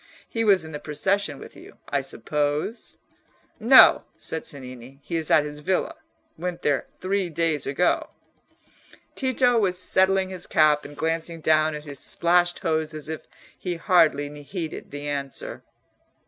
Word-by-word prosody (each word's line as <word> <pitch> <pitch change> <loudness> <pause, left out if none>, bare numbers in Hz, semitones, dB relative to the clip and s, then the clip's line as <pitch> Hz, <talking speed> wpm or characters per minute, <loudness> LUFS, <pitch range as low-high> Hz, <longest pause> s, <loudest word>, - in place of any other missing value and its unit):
He 225 - -2
was 195 -6 +4
in 160 - -9
the 150 - -6
procession 160 +1 -1
with - - -12
you, - - -14
I - - 0
suppose?" 150 +9 -3 0.6
"No," 240 +4 +7
said 160 - -5
Cennini; 130 -1 -9
"he 170 - -5
is 160 -2 -2
at 150 - +5
his 150 0 -7
villa—went 180 0 -4
there 145 -2 +1
three 190 -1 -1
days 165 -2 -1
ago." 145 +6 +1 1.0
Tito 250 -2 +2
was 185 -4 +1
settling 190 +1 +2
his 185 - -5
cap 150 -1 +3
and 145 0 -11
glancing 165 +1 -2
down 155 0 +2
at 150 - -7
his 140 -3 -7
splashed 175 +1 +2
hose 155 -1 0
as 155 0 -5
if 160 - -6 0.3
he 180 -2 -4
hardly 150 -4 +2
heeded 160 +1 -6
the 145 0 -6
answer. 140 -2 -4
160 Hz, 150 wpm, -24 LUFS, 150-185 Hz, 1.0 s, No